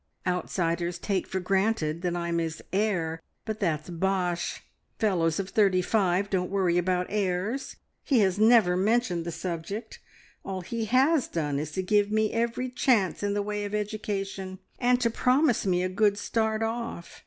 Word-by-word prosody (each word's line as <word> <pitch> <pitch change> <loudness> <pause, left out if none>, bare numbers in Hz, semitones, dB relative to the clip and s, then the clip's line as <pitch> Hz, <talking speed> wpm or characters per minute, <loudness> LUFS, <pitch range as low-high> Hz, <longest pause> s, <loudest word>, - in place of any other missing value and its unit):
Outsiders 175 -1 -1
take 190 +1 -2
for 190 - -2
granted 190 -4 0
that 175 -1 -1
I'm 170 -1 -1
his 165 -1 -3
heir, 180 -6 0 0.2
but 215 -1 -4
that's 160 -3 -1
bosh. 175 -1 -1 0.3
Fellows 170 -6 +1
of 195 -1 -3
thirty 195 -4 +3
five 195 -1 +1
don't 180 -2 0
worry 185 -3 +2
about 180 0 0
heirs. 205 +6 -1 0.3
He 255 -6 +3
has 190 0 +2
never 220 -5 +5
mentioned 190 -3 +1
the 170 - -3
subject; 175 +6 -5 0.4
all 190 -1 -4
he 225 +5 -3
has 265 +6 +3
done 145 -4 -2
is 150 +1 -3
to 190 - -1
give 205 +2 +2
me 215 0 +1
every 235 +2 -1
chance 240 -7 +2
in 205 0 0
the 205 - 0
way 210 0 -3
of 205 +1 -3
education, 195 -2 -3 0.2
and 245 0 +3
to 230 -1 +2
promise 250 -1 +2
me 180 -1 +2
a - - +1
good 205 +2 +2
`start 220 +1 -1
off.' 230 -6 -6
195 Hz, 165 wpm, -27 LUFS, 175-220 Hz, 0.4 s, never